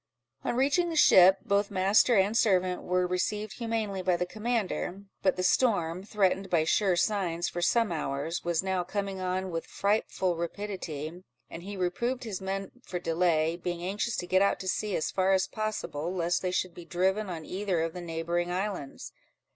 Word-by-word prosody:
On - - -1
reaching 285 +7 +2
the 330 - -3
ship, 190 - +7
both 200 0 +1
master 200 +5 +4
and 200 +2 +3
servant 185 -5 +2
were 180 0 +1
received 210 +5 -2
humanely 220 -4 -2
by 180 -1 +2
the 180 - -1
commander; 210 -2 -2 0.2
but 190 - +2
the 185 - -2
storm, 185 -5 +2
threatened, 195 -2 0
by 170 -3 +3
sure 190 +3 +2
signs, 175 -3 0
for 175 - -4
some 225 +4 +2
hours, 150 +1 -2
was 170 0 0
now 190 -1 0
coming 195 +1 -3
on 185 0 -2
with 165 -1 -4
frightful 200 -3 0
rapidity, 170 -3 -5 0.3
and 165 - -7
he 200 +2 -7
reproved 235 +8 -1
his 210 -5 -5
men 195 +1 -3
for 180 - -4
delay, 165 -1 +1
being 175 0 -4
anxious 205 +5 -1
to 175 - -3
get 185 +1 +3
out 200 - +2
to 190 - -6
sea, 205 +1 -1
as 155 - -1
far 190 0 +2
as 190 0 +3
possible, 210 -7 -3
lest 175 -1 0
they 185 - -1
should 180 -1 -1
be 175 - -10
driven 190 +4 0
on 165 -3 -6
either 190 -3 -1
of 165 0 -2
the 180 - -6
neighbouring 170 +1 -2
islands. 185 -6 -4
185 Hz, 185 wpm, -29 LUFS, 175-205 Hz, 0.3 s, ship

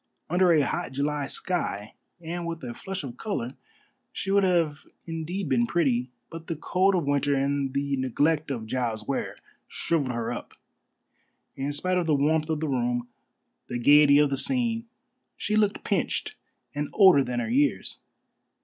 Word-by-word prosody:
Under 180 0 +4
a 150 -4 +4
hot 175 -6 -3
July 145 +1 -1
sky 125 - -3 0.3
and 170 +1 -5
with 165 -3 -5
a 120 -1 -5
flush 190 +6 -6
of 125 -4 -7
color 130 - -3 0.6
she 195 - -3
would 200 0 +4
have 170 -5 +2 0.3
indeed 165 +3 -4
been 120 -3 +2
pretty; 130 -7 +1 0.2
but 165 0 -9
the 165 - -2
cold 185 +5 +2
of 170 -5 0
winter 145 0 +1
and 140 0 0
the 140 0 0
neglect 145 +4 +1
of 120 -5 -3
Giles 115 -2 -2
Ware - - -2 0.3
shrivelled 145 -6 -1
her 120 -1 -2
up. - - -8 1.0
In 135 +2 -2
spite 180 +5 0
of 170 - -2
the 155 - +3
warmth 155 +2 +1
of 155 -1 -1
the 160 - -1
room, 120 -2 -1 0.6
the 120 - -3
gaiety 145 +3 +6
of 145 -1 +4
the 135 - 0
scene, 235 - 0 0.5
she 210 - -1
looked 210 -1 +1
pinched - - -1 0.4
and 145 0 -3
older 185 -9 +7
than 125 -1 -2
her 115 - -2
years. 135 -6 +1
145 Hz, 165 wpm, -26 LUFS, 130-175 Hz, 1.0 s, older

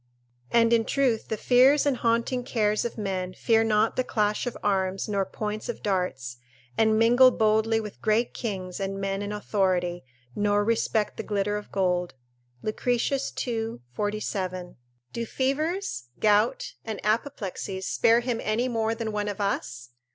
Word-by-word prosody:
["And 230 0 +4
in 230 -1 +4
truth 245 -2 0
the 220 - -2
fears 260 +6 +5
and 280 -3 +2
haunting 235 +2 0
cares 215 -3 0
of 235 - -4
men 185 -3 -3
fear 225 -1 +3
not 220 0 +2
the 255 - +2
clash 210 0 0
of 245 - -4
arms 190 -1 0
nor 200 -3 0
points 215 +3 -4
of 240 - -5
darts, 160 - -2 0.4
and 220 - +3
mingle 245 +3 +6
boldly 220 -1 +2
with 210 -2 -8
great 220 +2 +1
kings 185 -5 -4
and 195 0 -3
men 195 0 -2
in 205 0 -4
authority, 185 -4 0 0.3
nor 205 0 +2
respect 220 -1 0
the - - -2
glitter 205 0 -1
of 210 - -6
gold." 180 -3 0 0.5
Lucretius, 245 +5 0
ii. 225 - -3 0.2
47.] 190 - -3 0.4
Do 235 - -2
fevers, 300 - -1
gout, 215 +4 +2
and 220 -2 -5
apoplexies 205 -4 -2
spare 230 +1 +3
him 240 -2 -2
any 220 +4 0
more 225 -2 0
than 225 -1 -3
one 210 0 -2
of 205 0 -4
us? 125 -11 -3
215 Hz, 155 wpm, -26 LUFS, 195-230 Hz, 0.5 s, mingle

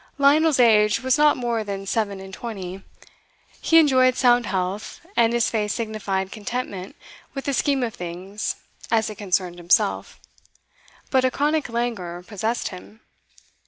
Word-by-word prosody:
Lionel's 290 +1 +4
age 210 -3 +5
was 260 0 +3
not 300 0 +4
more 235 -3 -1
than 195 -1 -5
seven 200 -1 -1
and 190 0 -10
twenty; 195 -4 -6 0.8
he 330 - +4
enjoyed 260 -5 +5
sound 245 -3 +4
health, 190 - -3
and 230 -1 +4
his 235 -1 +1
face 210 -2 -1
signified 200 -4 -3
contentment 210 -3 -5 0.4
with 275 - -5
the 280 - 0
scheme 270 0 +1
of 230 -2 -2
things 180 +4 -5 0.3
as 220 -1 +1
it 210 - -11
concerned 185 -3 -1
himself; 175 +1 +1 0.9
but 260 -1 +3
a 260 - +4
chronic 295 +1 0
languor 215 -8 -3
possessed 220 +4 -2
him. 205 +4 -12
220 Hz, 145 wpm, -23 LUFS, 195-255 Hz, 0.9 s, age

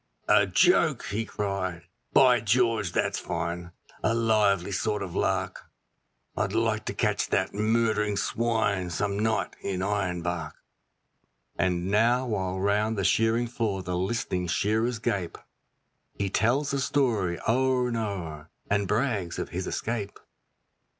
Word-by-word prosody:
'A - - +5
joke!' - - +3
he 110 +3 -1
cried, 95 -5 -3 0.3
'By 125 -3 +6
George, 115 -3 +2
that's - - 0
fine; 85 +1 -4 0.3
a 115 - +1
lively 105 -5 +2
sort 105 +2 -1
of 90 - -6
lark; - - -1 0.7
I'd - - -1
like 110 -1 0
to - - -4
catch 105 -3 0
that 95 - 0
murdering 105 -1 +1
swine 105 -5 0
some 100 +3 -1
night 110 +1 0
in 95 -2 -3
Ironbark.' 90 -5 -2 1.0
And 90 +1 0
now 120 +5 +3
while 95 -5 -2
round 105 +3 +1
the 100 - 0
shearing 115 +4 +2
floor 110 -5 -2
the 90 -1 -3
list'ning 90 -1 -1
shearers 110 +7 +1
gape, 95 -5 -2 0.8
He 100 -2 -2
tells 130 +8 +1
the 140 - 0
story 115 -11 +1
o'er 130 +1 +2
and 115 - -2
o'er, 85 -8 -4 0.2
and 100 -1 +2
brags 105 -5 -1
of - - -4
his 90 +2 -4
escape. 110 -3 -3
105 Hz, 135 wpm, -27 LUFS, 95-115 Hz, 1.0 s, By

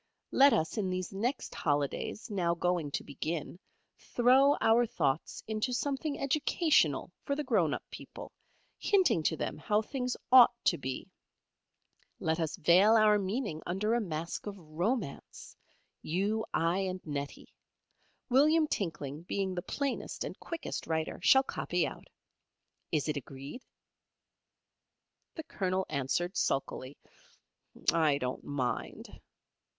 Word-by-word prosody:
Let 280 +1 +6
us 160 +4 0
in 190 -3 0
these 185 0 -3
next 240 +7 -2
Holidays, 145 - -2
now 175 -4 +1
going 175 -3 0
to - - -3
begin, 155 +4 -5 0.4
throw 265 +4 +4
our 230 +2 +4
thoughts 150 -6 -1
into 220 +3 -2
something 280 +3 -2
educational 280 - +2
for 280 - -1
the 300 - -2
grown 205 - +2
up - - -3
people, - - -9 0.5
hinting 375 - +3
to 160 +1 0
them - - -4
how 210 +7 +1
things 250 +1 -3
ought 245 -2 +8
to 170 - +3
be. 130 -1 -5 1.1
Let 160 +1 0
us 160 -2 -1
veil 185 +6 +5
our 215 -1 +5
meaning 200 -4 -3
under 205 +5 0
a 240 - +2
mask 170 0 -4
of 200 -1 -5
romance;[A] 175 - -4 0.5
you, 205 +7 0
I, 170 +3 +1
and 185 -1 -2
Nettie. 145 -2 -6 0.7
William 305 +5 +4
Tinkling 160 - -3
being 190 +2 -2
the 175 - -3
plainest 275 +8 -3
and - - -5
quickest 335 -1 -5
writer, 160 -1 -2
shall 265 +8 +6
copy - - -1
out. - - -8 0.8
Is 155 -2 0
it 150 -1 -1
agreed?" 140 - -8 1.7
The 320 - -5
Colonel 190 -9 -1
answered, 155 +6 -1
sulkily, 135 0 -2 1.0
"I 155 -4 +3
don't 125 -2 -4
mind." 130 -4 -4
185 Hz, 130 wpm, -31 LUFS, 155-240 Hz, 1.7 s, ought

